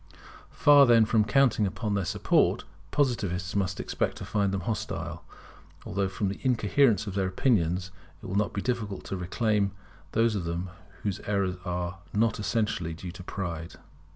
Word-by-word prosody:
Far, 145 Hz, -2 st, +6 dB
then, 115 Hz, -2 st, +6 dB
from 110 Hz, 0 st, +3 dB
counting 115 Hz, -2 st, +3 dB
upon 105 Hz, +2 st, -3 dB
their 100 Hz, -3 st, 0 dB
support, -, -, +2 dB, 0.3 s
Positivists 100 Hz, -, 0 dB
must 95 Hz, -2 st, 0 dB
expect -, -, -2 dB
to -, -, -6 dB
find 100 Hz, -2 st, 0 dB
them 95 Hz, -1 st, -2 dB
hostile: 105 Hz, +3 st, -4 dB, 0.6 s
although 100 Hz, -1 st, -1 dB
from 100 Hz, +2 st, -2 dB
the 95 Hz, -, -5 dB
incoherence 120 Hz, -3 st, +3 dB
of 100 Hz, -, -5 dB
their 95 Hz, -1 st, 0 dB
opinions 90 Hz, -, +1 dB, 0.3 s
it -, -, -13 dB
will 95 Hz, -, -5 dB
not 100 Hz, +1 st, +1 dB
be 100 Hz, -, -3 dB
difficult 105 Hz, -6 st, -2 dB
to -, -, -4 dB
reclaim 100 Hz, +2 st, 0 dB, 0.4 s
those 115 Hz, 0 st, +3 dB
of 100 Hz, -4 st, -2 dB
them 85 Hz, +2 st, -3 dB, 0.3 s
whose 100 Hz, -1 st, -2 dB
errors 100 Hz, -3 st, 0 dB
are 90 Hz, 0 st, -3 dB
not 110 Hz, +1 st, +1 dB
essentially 105 Hz, -6 st, -1 dB
due 85 Hz, +2 st, -7 dB
to 90 Hz, -, -10 dB
pride. 85 Hz, -3 st, -5 dB
100 Hz, 165 wpm, -28 LUFS, 90-110 Hz, 0.6 s, Far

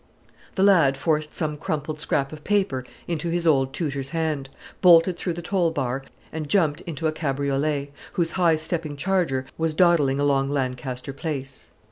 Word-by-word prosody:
The 190 Hz, -, +2 dB
lad 165 Hz, -9 st, +5 dB
forced 150 Hz, 0 st, -1 dB
some 150 Hz, -2 st, -2 dB
crumpled 150 Hz, 0 st, -3 dB
scrap 140 Hz, -2 st, 0 dB
of 150 Hz, -1 st, -10 dB
paper 190 Hz, -11 st, 0 dB, 0.2 s
into 170 Hz, 0 st, -2 dB
his 170 Hz, 0 st, 0 dB
old 135 Hz, -4 st, +3 dB
tutor's 140 Hz, -4 st, -3 dB
hand, 155 Hz, -4 st, -2 dB, 0.3 s
bolted 175 Hz, 0 st, +6 dB
through 175 Hz, 0 st, -3 dB
the 170 Hz, +1 st, -7 dB
toll 175 Hz, -1 st, +1 dB
bar, 135 Hz, -4 st, -2 dB, 0.3 s
and 155 Hz, -2 st, -4 dB
jumped 155 Hz, -6 st, +2 dB
into 160 Hz, -2 st, -4 dB
a 155 Hz, -, +3 dB
cabriolet, 140 Hz, -1 st, -1 dB, 0.2 s
whose 165 Hz, -2 st, +1 dB
high 175 Hz, -3 st, +3 dB
stepping 155 Hz, -2 st, -2 dB
charger 165 Hz, -6 st, 0 dB
was 160 Hz, -1 st, 0 dB
dawdling 155 Hz, -6 st, +4 dB
along 140 Hz, -1 st, +2 dB
Lancaster 130 Hz, -1 st, -3 dB
Place. 135 Hz, -3 st, -5 dB
155 Hz, 160 wpm, -24 LUFS, 135-170 Hz, 0.3 s, bolted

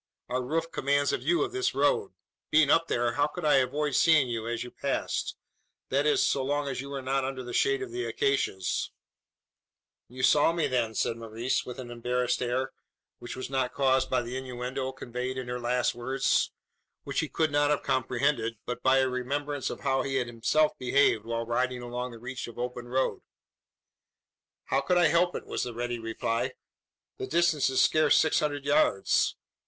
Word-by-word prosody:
Our 125 Hz, +1 st, 0 dB
roof 165 Hz, +6 st, -2 dB
commands 140 Hz, +1 st, +1 dB
a -, -, 0 dB
view 350 Hz, +1 st, +2 dB
of 395 Hz, -, -3 dB
this 385 Hz, +1 st, -1 dB
road. 435 Hz, -5 st, +1 dB, 0.4 s
Being 150 Hz, -2 st, +5 dB
up 165 Hz, 0 st, +4 dB
there, 120 Hz, 0 st, +1 dB
how 145 Hz, +4 st, +1 dB
could 160 Hz, +2 st, -6 dB
I 150 Hz, -, +5 dB
avoid 145 Hz, +3 st, 0 dB
seeing 150 Hz, -4 st, +5 dB
you 115 Hz, -1 st, -3 dB
as 120 Hz, 0 st, -2 dB
you 125 Hz, -, -9 dB
passed -, -, -2 dB, 0.5 s
that 140 Hz, +3 st, +2 dB
is, 150 Hz, -, +3 dB
so 135 Hz, -, +1 dB
long 145 Hz, +1 st, -1 dB
as 130 Hz, -2 st, -3 dB
you 140 Hz, -, -8 dB
were 140 Hz, -1 st, -5 dB
not 135 Hz, +1 st, 0 dB
under 130 Hz, -1 st, -4 dB
the 120 Hz, 0 st, -7 dB
shade 400 Hz, -1 st, +2 dB
of 380 Hz, -, -7 dB
the 370 Hz, +1 st, -3 dB
acacias?" 410 Hz, -, 0 dB, 1.2 s
"You 130 Hz, +2 st, -7 dB
saw 130 Hz, +5 st, +5 dB
me, 170 Hz, -2 st, 0 dB
then?" 115 Hz, -3 st, 0 dB
said 115 Hz, -, 0 dB
Maurice, 115 Hz, +2 st, -2 dB
with 125 Hz, -, -6 dB
an 125 Hz, -2 st, -7 dB
embarrassed 125 Hz, +1 st, -1 dB
air, 130 Hz, +2 st, -1 dB, 0.5 s
which 120 Hz, -, -7 dB
was 130 Hz, -, -5 dB
not 130 Hz, -2 st, -1 dB
caused 130 Hz, -1 st, +2 dB
by 125 Hz, -1 st, +1 dB
the 120 Hz, +2 st, -6 dB
innuendo 130 Hz, 0 st, -4 dB
conveyed 125 Hz, 0 st, -5 dB
in 130 Hz, -1 st, -4 dB
her 125 Hz, 0 st, -3 dB
last 125 Hz, +1 st, +1 dB
words 130 Hz, +3 st, 0 dB, 0.5 s
which -, -, -2 dB
he -, -, -1 dB
could 160 Hz, -2 st, 0 dB
not 145 Hz, 0 st, +3 dB
have 150 Hz, -, +1 dB
comprehended 125 Hz, -2 st, 0 dB
but 125 Hz, 0 st, -4 dB
by 130 Hz, 0 st, +4 dB
a 130 Hz, -, +2 dB
remembrance 140 Hz, +3 st, -2 dB
of -, -, -7 dB
how 135 Hz, -1 st, +1 dB
he 135 Hz, 0 st, -3 dB
had 130 Hz, -2 st, +1 dB
himself 120 Hz, +6 st, +1 dB
behaved 125 Hz, -4 st, +3 dB
while 115 Hz, 0 st, -2 dB
riding 125 Hz, +1 st, -1 dB
along 125 Hz, +1 st, -4 dB
the 120 Hz, -, -10 dB
reach 130 Hz, +3 st, -6 dB
of 120 Hz, -, -11 dB
open 125 Hz, 0 st, -4 dB
road. 130 Hz, +2 st, 0 dB, 1.4 s
"How -, -, +1 dB
could 180 Hz, -, +1 dB
I 170 Hz, -3 st, +5 dB
help 175 Hz, +2 st, +2 dB
it?" -, -, -5 dB
was -, -, -3 dB
the 120 Hz, -2 st, -5 dB
ready 120 Hz, 0 st, -3 dB
reply. 115 Hz, 0 st, -2 dB, 0.7 s
"The 130 Hz, -, -3 dB
distance 165 Hz, -4 st, +2 dB
is 130 Hz, -, +1 dB
scarce 155 Hz, -1 st, +4 dB
six 160 Hz, -, +3 dB
hundred 145 Hz, -2 st, -2 dB
yards. 140 Hz, -8 st, +2 dB
130 Hz, 195 wpm, -28 LUFS, 120-145 Hz, 1.4 s, Being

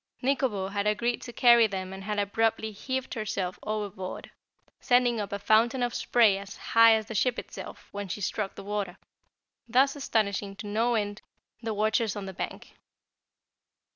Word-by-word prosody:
Nikobo 250 Hz, -8 st, 0 dB
had 200 Hz, +1 st, -1 dB
agreed 235 Hz, +3 st, 0 dB
to 240 Hz, -, -8 dB
carry 235 Hz, -1 st, +6 dB
them 190 Hz, -2 st, -5 dB
and 190 Hz, 0 st, -8 dB
had 210 Hz, +1 st, -3 dB
abruptly 220 Hz, +2 st, 0 dB
heaved 260 Hz, +5 st, -4 dB
herself 200 Hz, -5 st, -3 dB
overboard, 205 Hz, -3 st, -5 dB, 0.5 s
sending 245 Hz, -2 st, +3 dB
up 205 Hz, -, -5 dB
a 200 Hz, -, -1 dB
fountain 230 Hz, +5 st, +3 dB
of 240 Hz, 0 st, -1 dB
spray 220 Hz, -5 st, +3 dB
as 200 Hz, 0 st, -9 dB
high 230 Hz, 0 st, +6 dB
as 220 Hz, -1 st, -2 dB
the 225 Hz, -, -7 dB
ship 245 Hz, +3 st, +1 dB
itself -, -, -8 dB
when 205 Hz, -1 st, -5 dB
she 185 Hz, -, -4 dB
struck 200 Hz, +1 st, -2 dB
the -, -, -9 dB
water, 200 Hz, -3 st, -3 dB, 0.7 s
thus 270 Hz, +4 st, +4 dB
astonishing 200 Hz, -7 st, -1 dB
no 225 Hz, +4 st, +1 dB
end 205 Hz, -1 st, -2 dB, 0.4 s
the 225 Hz, -2 st, -3 dB
watchers 215 Hz, +1 st, +1 dB
on 205 Hz, -2 st, -5 dB
the 190 Hz, -, -6 dB
bank. -, -, -6 dB
215 Hz, 165 wpm, -28 LUFS, 200-235 Hz, 0.7 s, carry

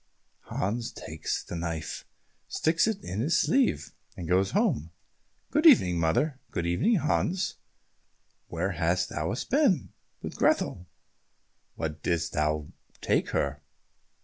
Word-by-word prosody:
Hans 115 Hz, +5 st, -2 dB
takes -, -, -4 dB
the -, -, -7 dB
knife, 85 Hz, -2 st, -4 dB, 0.4 s
sticks 165 Hz, +5 st, +2 dB
it 210 Hz, -3 st, -2 dB
in 95 Hz, -, -4 dB
his 145 Hz, +9 st, +2 dB
sleeve, 265 Hz, -2 st, +2 dB, 0.3 s
and 85 Hz, -, -5 dB
goes 95 Hz, +2 st, +3 dB
home. 80 Hz, -3 st, +1 dB, 0.6 s
"Good 305 Hz, +3 st, +5 dB
evening, 90 Hz, -, +6 dB
mother." 130 Hz, -, +1 dB
"Good 85 Hz, -, -3 dB
evening, 135 Hz, -, +2 dB
Hans. 180 Hz, +3 st, 0 dB, 0.9 s
Where 85 Hz, +4 st, -2 dB
hast 90 Hz, +1 st, 0 dB
thou 80 Hz, +3 st, -2 dB, 0.2 s
been?" 195 Hz, -, +2 dB, 0.3 s
"With -, -, -5 dB
Grethel." 90 Hz, -, +1 dB, 0.9 s
"What 80 Hz, -1 st, -4 dB
didst 85 Hz, 0 st, -1 dB
thou 75 Hz, -1 st, 0 dB, 0.3 s
take -, -, +1 dB
her?" 70 Hz, -1 st, -1 dB
90 Hz, 120 wpm, -28 LUFS, -, 0.9 s, evening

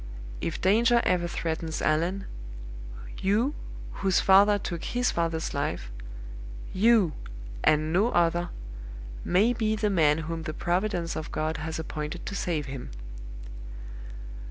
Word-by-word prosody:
If 165 Hz, -, -3 dB
danger 230 Hz, +5 st, +4 dB
ever 175 Hz, -1 st, +2 dB
threatens 160 Hz, -1 st, -3 dB
Allan, 170 Hz, +6 st, 0 dB, 1.0 s
you, 220 Hz, +9 st, +2 dB, 0.5 s
whose 190 Hz, -2 st, +3 dB
father 200 Hz, +2 st, +6 dB
took 170 Hz, -4 st, -5 dB
his 245 Hz, 0 st, 0 dB
father's 165 Hz, -1 st, -1 dB
life -, -, -3 dB, 0.8 s
YOU, 205 Hz, -4 st, +4 dB, 0.5 s
and 155 Hz, +1 st, +3 dB
no 205 Hz, +7 st, +3 dB
other, 175 Hz, -2 st, +1 dB, 0.7 s
may 210 Hz, +7 st, +3 dB
be 220 Hz, -2 st, 0 dB
the 210 Hz, -1 st, 0 dB
man 155 Hz, -5 st, +4 dB
whom 165 Hz, 0 st, -4 dB
the 155 Hz, -1 st, -5 dB
providence 175 Hz, -1 st, -1 dB
of 155 Hz, -, -5 dB
God 155 Hz, +1 st, -2 dB
has 160 Hz, +1 st, -4 dB
appointed 155 Hz, -1 st, -5 dB
to -, -, -5 dB
save 170 Hz, -6 st, -2 dB
him. 135 Hz, -2 st, -7 dB
175 Hz, 125 wpm, -27 LUFS, 160-205 Hz, 1.0 s, father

